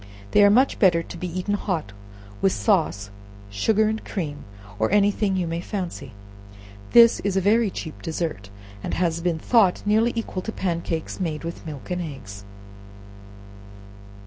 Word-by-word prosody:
They 205 - +6
are 205 - +7
much 255 +6 +3
better 170 -4 +4
to - - -10
be 180 - -4
eaten 185 +4 -3
hot, 175 - -2 0.5
with 195 - +3
sauce, 155 - 0 0.4
sugar 215 - +2
and 220 +1 -2
cream, 150 -7 -5 0.3
or 110 - +2
any 205 0 +4
thing 200 -2 -1
you 185 -2 0
may 165 +1 -3
fancy. 175 - -5 0.8
This 235 -1 +7
is 195 -1 -1
a - - +5
very 210 +3 +3
cheap 160 -4 -7
dessert, 160 - -4 0.3
and - - -3
has 170 -2 0
been 170 -1 0
thought 195 +1 +3
nearly 220 +3 +3
equal 220 -5 -3
to 220 - -5
pan 175 -5 -2
cakes 165 +1 -4
made 160 -4 -3
with 170 0 -7
milk 150 +2 -8
and 180 0 -1
eggs. 110 - -8
180 Hz, 165 wpm, -24 LUFS, 160-205 Hz, 0.8 s, are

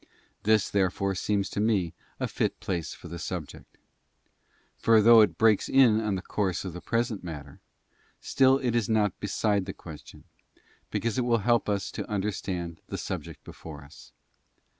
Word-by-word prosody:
This, 110 -1 +3
therefore, 100 0 +1
seems 100 +1 0
to - - -3
me 105 -6 +1 0.3
a - - -1
fit - - -2
place 95 -7 -3
for - - -10
the 85 +1 -7
subject. 90 -4 -7 1.0
For 115 -1 +4
though 115 +1 +8
it 90 -6 +2
breaks 110 -2 +3
in 120 -5 +5
on 105 -2 0
the 95 - -5
course 95 -4 -2
of 90 - -5
the 90 - -8
present 115 -3 -1
matter, 75 -5 -8 0.6
still 135 0 +3
it 125 -4 -1
is 115 -4 +1
not 105 -4 +1
beside 105 -1 0
the 95 - -4
question, 80 -3 -12 0.7
because 115 0 -1
it - - +1
will 120 -1 +2
help 120 -3 +2
us 100 -1 -1
to - - -6
un 100 -2 0
derstand 90 -5 -3
the - - -5
subject - - -6
before 75 -3 -10
us. 70 +3 -15
100 Hz, 170 wpm, -27 LUFS, 90-110 Hz, 1.0 s, though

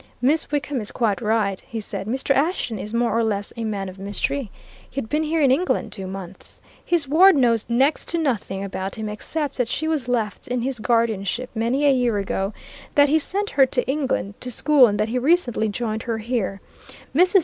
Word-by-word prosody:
"Miss 290 +6 +2
Wickham 290 -3 -1
is 210 - -4
quite 220 -4 0
right," 215 -3 0
he 230 -3 -6
said. 200 -2 -5
"Mr. 265 +4 +1
Ashton 275 - 0
is 210 - -6
more 235 -1 +1
or 230 - +2
less 205 -2 -2
a 230 - -4
man 205 -3 -2
of 185 +1 -10
mystery. 205 +5 -2 0.4
He - - -26
had 220 - -5
been 300 +3 +1
here 315 +1 0
in 275 -3 +5
England 350 +8 +1
two 190 -2 -6
months. 190 -1 -9 0.2
His 340 -5 0
ward 360 +6 +7
knows 235 -5 +2
next 265 +6 +2
to 340 - -1
nothing 225 -10 -1
about 190 0 -4
him, 220 -1 -4
except 285 +8 -3
that 250 -3 +1
she 315 +6 -2
was 305 -6 -1
left 230 -4 -2
in 250 -1 -1
his 260 -2 -2
guardianship 230 0 0
many 240 +6 0
a 280 - +6
year 245 -4 +1
ago, 195 0 -1 0.4
that 285 0 +6
he 315 +2 +4
sent 405 +6 -2
her 270 -2 +5
to 250 -1 -1
England, 265 -8 -1
to 250 - -5
school, 275 +1 +5
and 205 -1 -1
that 215 - +1
he 250 +2 0
recently 250 -7 +2
joined 220 +1 -3
her 230 -2 -2
here. 215 -4 -2 0.5
Mrs. 365 +4 +5
240 Hz, 210 wpm, -23 LUFS, 210-280 Hz, 0.5 s, ward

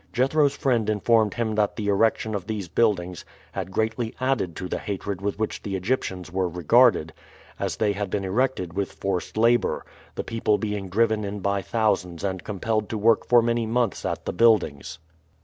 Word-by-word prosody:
Jethro's 140 +3 +2
friend 120 -5 +1
informed 110 0 +2
him 115 -2 -1
that 105 -1 +1
the 105 - -3
erection 110 +2 +2
of 100 -3 -4
these 105 -4 -3
buildings 90 -3 0 0.3
had 95 -2 -4
greatly 110 +3 -2
added 130 - 0
to 90 - -5
the - - -3
hatred 100 -1 -4
with 100 0 -2
which 110 0 -3
the 100 -2 -4
Egyptians 95 -3 -2
were 95 -1 0
regarded, 90 - +3 0.5
as - - -2
they 110 -2 +2
had 100 -1 -3
been 100 0 -2
erected 95 -4 0
with 100 0 -2
forced 95 +1 -3
labor, 115 -1 +2 0.3
the - - -3
people 110 -2 0
being 105 -2 -3
driven 110 +2 +2
in 100 0 -4
by 100 0 0
thousands 95 -5 -1
and 95 -3 -2
compelled 110 +1 -2
to 110 - -2
work 115 +2 +3
for 120 -1 +5
many 115 -1 0
months 115 -4 0
at - - -3
the - - -2
buildings. 105 -12 +2
105 Hz, 185 wpm, -25 LUFS, 95-115 Hz, 0.5 s, for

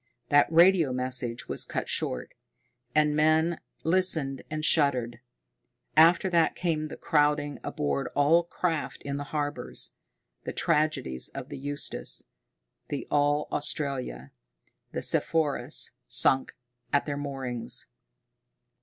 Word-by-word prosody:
That 145 +2 +4
radio 170 -3 +5
message 125 -2 -2
was - - +1
cut - - -4
short 65 - -2 0.6
and 150 -1 +3
men 155 +2 +2 0.2
listened 160 -6 +1
and 155 0 -3
shuddered. 130 -7 +2 0.8
After 170 +4 +6
that 170 -2 +3
came 160 -3 -1
the - - -9
crowding 145 -1 +1
aboard 70 -1 -2
all 150 +4 +4
craft 170 -2 -3
in 140 0 -3
the 145 - -5
harbors, 145 0 -3 0.5
the - - -5
tragedies 150 - 0
of 135 0 -8
the 145 - -7
Eustis, 145 +1 -2 0.7
the 145 - -4
All 145 0 +2
Australia, 135 - -2 0.6
the - - -4
Sepphoris, 150 -4 +2 0.2
sunk 135 0 +3 0.4
at 145 - +2
their 145 - -3
moorings. 135 -4 -3
145 Hz, 115 wpm, -27 LUFS, 135-155 Hz, 0.8 s, After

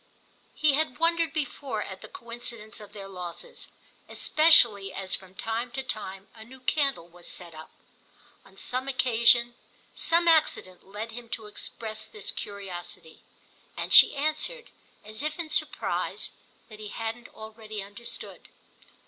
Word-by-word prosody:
He 305 -2 +4
had 300 -2 +1
wondered 330 -1 +2
before 275 -6 -3
at 190 -1 -8
the - - -8
coincidence 235 -2 -7
of 210 -1 -11
their 195 -2 -8
losses, 180 -3 -6 0.4
especially 235 -12 +5
as 190 0 -3
from 190 -1 -2
time 225 +4 -2
to 265 - -2
time 195 -6 -5
a 220 - -11
new 260 +4 -13
candle 265 - +1
was 175 0 -10
set 175 -2 -1
up. 155 0 -10 0.7
On - - -19
some 255 +2 0
occasion 240 -2 +4 0.4
some 340 +1 +4
accident 310 - +4
led 210 +3 -5
him 235 0 -9
to 225 -1 -4
express 220 +1 -2
this 425 - -2
curiosity, 185 -5 -6 0.6
and - - -2
she - - +10
answered 310 - -1 0.3
as 215 +3 -1
if 305 +1 -2
in 330 -3 -5
surprise - - -1 0.4
that 215 -1 -12
he 215 - -6
hadn't 225 +2 -5
already 220 -1 -7
understood. 205 +4 -6
225 Hz, 140 wpm, -28 LUFS, 200-275 Hz, 0.7 s, she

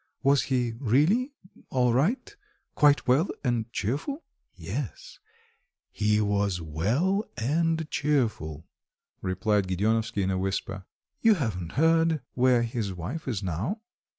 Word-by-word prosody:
Was 140 0 +4
he 125 -3 0
really 155 - +2 0.4
all 125 -2 +2
right 190 - 0 0.4
quite 145 -2 +4
well 135 +9 +4 0.2
and 115 -2 -1
cheerful?" 145 - -2 0.3
"Yes, - - -6 0.7
he 105 0 +1
was 100 -3 +1
well 115 - 0
and 160 +6 0
cheerful," 110 - -1 0.6
replied 95 +2 0
Gedeonovsky 105 +3 0
in 95 - 0
a 95 - -1
whisper. 95 0 -3 0.4
"You 225 -2 +6
haven't 95 - -3
heard 160 +1 +3
where 125 -1 +3
his 115 -4 -2
wife 90 - -5
is 110 -6 -2
now?" 100 - -2
120 Hz, 120 wpm, -27 LUFS, 100-155 Hz, 0.7 s, You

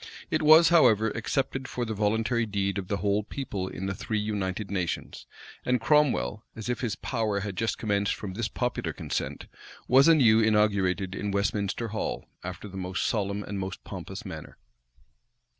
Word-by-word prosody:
It - - +1
was, 155 +2 +8
however, 110 -10 +5
accepted 130 +3 -2
for 120 - -3
the 110 - -3
voluntary 110 +3 +1
deed 100 -1 -1
of 95 - -6
the 100 - -1
whole 100 +1 +1
people 100 -6 -4
in 95 - -5
the 100 - -1
three 110 +3 -3
united 105 -1 -2
nations; 90 -4 -3 0.4
and 125 0 +1
Cromwell, 125 - +2
as 110 +1 -6
if 120 -1 -1
his 115 -5 -1
power 110 -5 -1
had 100 -1 -4
just 110 +3 -1
commenced 100 -2 0
from 100 -3 -6
this 110 +2 -2
popular 125 +1 -2
consent, - - -4 0.4
was 135 +4 +6
anew 125 -9 +6
inaugurated 100 -4 +2
in 100 +1 -3
Westminster 100 +2 -1
Hall, 110 +1 -3 0.2
after - - -6
the 95 -1 -9
most 95 +1 -2
solemn 100 -1 -1
and 100 0 -5
most 95 0 -5
pompous - - -7
manner. - - -8
105 Hz, 170 wpm, -27 LUFS, 100-115 Hz, 0.4 s, was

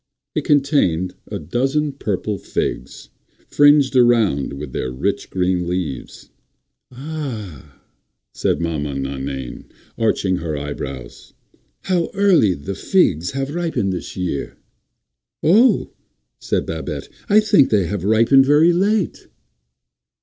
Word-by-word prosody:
It - - -2
contained 135 - +2
a - - -4
dozen 135 - -1
purple 105 -6 -3
figs, - - -4 0.4
fringed 145 -2 +4
around 115 - +3
with 70 -1 -7
their 65 - -2
rich, 65 - -2
green 90 -1 0
leaves. 85 -8 -5 0.6
"Ah," 125 - -7 0.5
said - - 0
Maman 75 -5 -2
Nainaine, 65 -1 -5 0.3
arching 100 -4 +1
her 80 -3 -4
eyebrows, 70 -3 -7 0.5
"how 180 -3 0
early 185 - +4
the 85 +7 -6
figs 90 - +1
have 135 +1 -3
ripened 160 - -1
this 90 - -7
year!" 90 -6 -3 0.9
"Oh," 220 +11 +4 0.5
said - - -1
Babette, - - -5 0.2
"I 210 +1 +6
think 210 -10 +4
they 100 -4 +2
have 95 +1 -4
ripened 115 +6 +4
very 155 +4 +5
late." 195 +1 0
105 Hz, 115 wpm, -20 LUFS, -, 0.9 s, I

